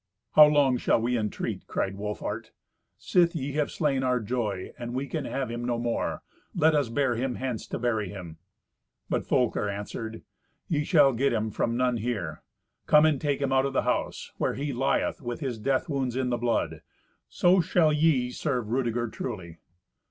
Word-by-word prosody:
"How 150 -1 +9
long 145 -4 +3
shall - - +2
we 120 +2 0
entreat?" 105 -3 -3
cried 100 0 -2
Wolfhart. 105 +1 -4 0.5
"Sith 170 -2 +2
ye 140 -2 -2
have 150 +1 0
slain 140 -4 0
our 125 -1 +1
joy, 105 -4 -3
and 120 0 -5
we 135 +2 -1
can 135 - -4
have 135 -3 -3
him 120 0 -4
no 120 -1 0
more, 120 0 -2 0.3
let 160 -1 +4
us 145 -5 +1
bear 135 +1 +1
him 125 +2 -2
hence 130 -4 -4
to - - -4
bury 110 -5 -1
him." 90 -5 -8 0.7
But - - -1
Folker 125 -5 +1
answered, 110 +2 -6 0.4
"Ye 150 -3 0
shall 145 -7 +5
get 135 +3 +1
him 110 -1 -1
from 115 +3 -1
none 125 -1 +2
here. 105 -9 -3 0.5
Come 150 0 +6
and 155 -3 +2
take 145 -2 0
him 135 -1 0
out 135 +1 +3
of 135 - -5
the - - +1
house, - - -2
where - - 0
he 140 0 -3
lieth 135 +4 0
with 120 -2 -4
his 130 -6 -3
death 135 +8 0
wounds 135 -5 -1
in 130 -1 0
the - - +2
blood. 120 0 -1 0.5
So 180 +1 +4
shall 160 -2 +3
ye 150 -5 +2
serve 125 -5 -2
Rudeger 120 -2 0
truly." 95 -8 -6
125 Hz, 185 wpm, -27 LUFS, 115-140 Hz, 0.7 s, How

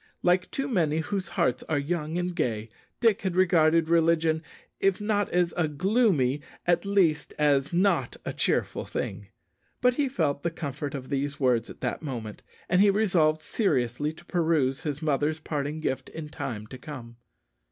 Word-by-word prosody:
Like 180 +1 +3
too 275 0 -2
many 165 - +1
whose 185 +3 -2
hearts 130 -7 0
are 155 - +2
young 155 +2 -2
and 180 0 -1
gay, 115 -8 -2 0.3
Dick 225 -4 +3
had 190 -3 -2
regarded 165 -3 +4
religion, 165 -1 +3 0.4
if 195 -1 +2
not 210 -1 0
as 175 -1 +1
a 175 -3 +1
gloomy, 155 - +2 0.2
at 175 +2 +2
least 180 -7 +2
as 145 -2 +2
not 190 +3 +1
a - - -3
cheerful - - 0
thing. - - -4 0.5
But 250 0 +4
he 280 +1 0
felt 150 - 0
the 170 - 0
comfort 145 -3 -5
of 130 -2 -7
these 140 +1 -2
words 125 -4 +2
at - - -11
that 125 - -2
moment, 120 -8 -6 0.3
and 180 +1 +3
he 205 - +6
resolved 175 -7 +2
seriously 145 - 0
to 175 +2 -16
peruse 160 -7 +1
his 150 0 -4
mother's 150 +1 +1
parting 150 0 -3
gift 130 - -2
in 155 -2 -7
time 110 -7 -5
to 130 - -10
come. 120 -5 -9
160 Hz, 170 wpm, -27 LUFS, 140-180 Hz, 0.5 s, he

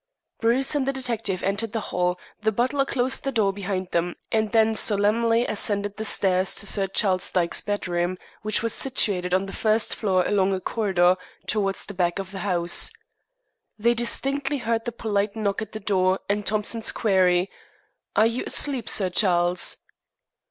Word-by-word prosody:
Bruce 245 +5 +2
and 280 -3 0
the - - +2
detective 230 -8 -2
entered 205 +3 -1
the 225 - -1
hall, 180 0 0 0.2
the 220 0 +1
butler 255 +6 0
closed 260 0 -1
the 275 - -1
door 210 -5 +1
behind 190 -2 -4
them, 175 +1 -1 0.2
and 220 -1 0
then 225 -1 +3
solemnly 225 +3 +2
ascended 205 -1 0
the 220 - -4
stairs 190 -3 +1
to - - -2
Sir 195 -1 +1
Charles 190 -1 +1
Dyke's 170 -2 0
bedroom, 180 -3 -2 0.2
which 215 +1 0
was 230 - +1
situated 195 -9 +1
on 190 +2 +1
the 195 - -8
first 215 0 +1
floor 185 -4 +1
along 195 -1 +1
a - - -3
corridor 185 -4 +1 0.3
towards 195 -2 -1
the 200 - -8
back 175 -2 0
of 195 -1 -6
the 195 - -6
house. 175 -3 +2 0.9
They 235 +2 +2
distinctly 275 +4 +1
heard 230 -2 -2
the 240 - -2
polite 210 -3 -2
knock 210 -1 -2
at 215 - -6
the 215 - -6
door 190 -2 +1
and 205 0 -1
Thompson's 215 +2 0
query, 185 -3 +2 0.6
"Are 215 - +5
you 230 +2 -1
asleep, 265 -6 +2
Sir 190 -3 +2
Charles?" 175 -2 +2
205 Hz, 170 wpm, -24 LUFS, 185-225 Hz, 0.9 s, Are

